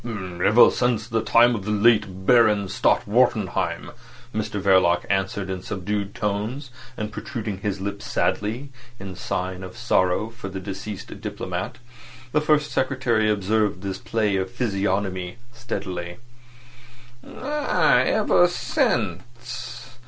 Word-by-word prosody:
"Ever 100 0 +3
since 120 -2 0
the 115 -1 0
time 120 +2 +5
of 105 -4 -3
the 105 - -4
late 105 -3 +2
Baron 110 -4 +5
Stott 95 - +2
Wartenheim," - - +1 0.4
Mr 105 -1 -2
Verloc 95 -3 +4
answered 95 0 -1
in 95 -1 -4
subdued 100 +1 -3
tones, 115 +5 -3 0.3
and 105 0 -4
protruding 105 -2 -5
his 100 -1 -2
lips 100 +1 -5
sadly, 120 +7 -1 0.3
in 95 -1 -7
sign 90 +1 -3
of 90 +4 -9
sorrow 110 -2 +1
for 115 -4 -8
the 95 0 -5
deceased 100 +1 -7
diplomat. - - -4 0.5
The 150 - +2
First 150 -1 +2
Secretary 125 -5 +1
observed 105 -1 +1
this 95 -1 -4
play 105 -3 0
of 95 0 -2
physiognomy 100 -4 -1 0.2
steadily. 90 -7 -5 1.1
"Ah! 295 +2 +1
ever 175 - +4
since. 120 - -3
105 Hz, 125 wpm, -24 LUFS, 95-120 Hz, 1.1 s, time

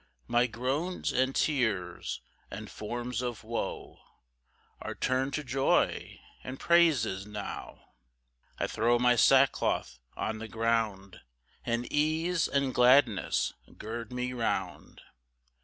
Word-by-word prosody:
5 - - -33
My 120 +1 +4
groans, 135 +10 -2
and 130 +1 +1
tears, 95 - -1 0.3
and - - -8
forms 120 +2 -4
of 120 -3 -4
woe, 115 +1 -5 0.8
Are - - -5
turn'd 130 +1 0
to 150 - -3
joy 135 0 0 0.2
and 130 +1 -7
praises 140 - +3
now; 105 -1 -7 0.7
I - - 0
throw 120 +2 +2
my 125 0 +4
sackcloth 130 - +3 0.2
on 110 0 -2
the 115 - -6
ground, 110 -4 -1 0.4
And 120 +1 -1
ease 160 +3 +1
and 140 -2 0
gladness 125 -4 +4 0.2
gird 115 +1 -6
me 125 0 -3
round. 120 -2 -3
125 Hz, 115 wpm, -30 LUFS, 110-135 Hz, 0.8 s, My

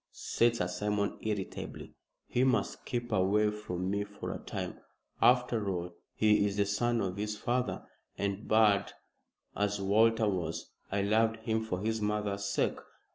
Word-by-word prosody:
said 120 0 +1
Sir 90 -6 0
Simon, 105 +2 -1
irritably. 105 -3 -4 0.3
"He 125 - +1
must 125 -6 +1
keep 120 -1 -3
away 105 +2 +3
from 95 -3 -3
me 100 0 0
for 105 0 -6
a - - -6
time. - - -5 0.4
After 120 -4 +3
all, 90 -1 -3 0.2
he 105 -1 +4
is 100 0 -1
the 100 - +3
son 115 +3 +1
of 95 0 -2
his 105 +1 -2
father, 125 +3 -1 0.3
and, 100 +1 -2
bad 110 -2 +4 0.6
as 105 0 0
Walter 110 +3 +3
was, 85 -5 -2 0.2
I 100 0 +1
loved 110 +2 +2
him 110 -1 +1
for 95 -5 -3
his 110 +1 -1
mother's 105 -1 -1
sake. 100 - 0
105 Hz, 155 wpm, -31 LUFS, 100-110 Hz, 0.6 s, he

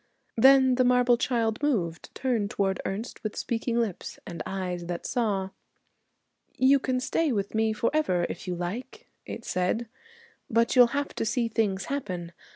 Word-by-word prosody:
Then 265 +2 +6
the 255 +1 +3
marble 250 -1 +4
child 235 -1 0
moved, 185 - -1
turned 235 -6 0
toward 195 -2 -1
Ernest 215 +5 -5
with 215 - -4
speaking 235 0 -1
lips 220 -6 -3
and 170 - -6
eyes 180 -2 -4
that 175 -1 -4
saw. 200 -6 -1 1.0
'You 270 +2 +5
can 255 -1 -1
stay 305 +4 0
with 200 -4 -2
me 220 0 +2
forever 215 - +1
if 175 - -7
you 180 - -2
like,' 235 - -6 0.2
it - - -7
said, 185 +6 -1 0.6
'but 230 +2 +2
you'll 245 -1 +8
have 285 0 -2
to - - -2
see 235 +1 0
things 210 -4 0
happen. 180 -12 -4
225 Hz, 160 wpm, -27 LUFS, 190-255 Hz, 1.0 s, you'll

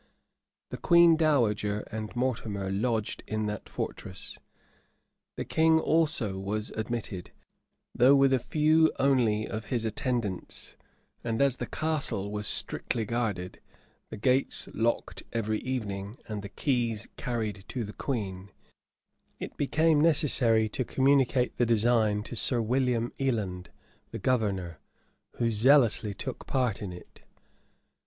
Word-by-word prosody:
The - - -4
queen 170 -2 +6
dowager 110 -10 +1
and 110 +1 -5
Mortimer 110 -6 -2
lodged 110 +1 -1
in 110 0 -2
that 105 -1 -5
fortress: - - -6 1.0
the - - -3
king 160 0 +3
also 150 -13 +1
was 105 +2 -3
admitted, 110 -4 -4 0.6
though 130 +3 +6
with 135 -1 +4
a 130 - +3
few 155 +4 +3
only 120 -6 +2
of 110 -1 -5
his 120 -2 -2
attendants: 110 -3 -3 0.5
and 115 -1 -2
as 140 -2 +3
the - - -4
castle 145 -11 -1
was 105 -1 -2
strictly 115 -3 0
guarded, 105 -6 -3 0.5
the - - -7
gates 125 +5 +1
locked 115 +1 -1
every 110 -2 -1
evening, 105 -4 -4
and 105 -2 -4
the 100 - -8
keys 115 -2 -1
carried 110 -5 -3
to 125 - -3
the 105 0 -7
queen, 100 -7 -4 0.9
it - - -6
became 155 +2 +2
necessary 130 -8 +4
to 130 - -2
communicate 130 -1 +2
the 120 - +3
design 110 -2 +2
to 120 - -7
Sir 120 +2 +2
William 120 0 0
Eland, 105 -9 -2 0.4
the - - -6
governor, 95 -9 -1 0.6
who 115 -1 0
zealously 115 -3 +4
took - - -6
part 125 -6 0
in 100 -3 -4
it. 90 - -13
115 Hz, 130 wpm, -28 LUFS, 105-130 Hz, 1.0 s, queen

